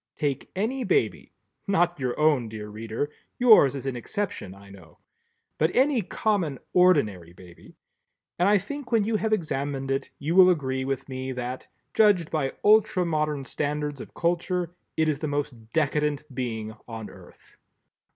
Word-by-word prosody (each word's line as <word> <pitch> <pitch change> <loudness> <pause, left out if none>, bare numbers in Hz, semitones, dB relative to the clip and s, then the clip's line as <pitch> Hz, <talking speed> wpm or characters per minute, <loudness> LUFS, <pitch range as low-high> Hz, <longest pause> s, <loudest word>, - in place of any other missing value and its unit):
Take 140 -2 -2
any 240 +7 -1
baby—not 195 - -1
your 125 0 -2
own, 145 -7 +3
dear 105 -1 -7
reader, 110 +7 -4 0.3
yours 215 - +6
is 135 - -6
an 135 -2 -2
exception 120 - -4
I 100 0 -15
know, 95 -6 -15 0.6
but 160 - +3
any 265 -2 +3
common 185 -7 -1 0.2
ordinary 105 - +3
baby—and 90 - -6
I 210 - +6
think 255 +7 -6
when 225 -3 +4
you 220 +1 0
have 220 +1 -1
examined 140 -7 -1
it 135 - -1
you 155 +4 -2
will 185 -1 +8
agree 130 -6 0
with 135 -1 -3
me 130 0 -4
that, 125 +1 -5 0.3
judged 205 -7 +4
by 145 -4 -1
ultra 210 -3 +4
modern 150 -3 -1
standards 145 +1 -3
of - - -11
culture, 175 0 0 0.3
it 160 0 +3
is 150 -2 0
the 155 - -2
most 135 -6 -4
decadent 150 -1 0
being 110 -4 -4
on 115 -2 -7
earth. 95 -3 -17
150 Hz, 150 wpm, -26 LUFS, 125-180 Hz, 0.6 s, will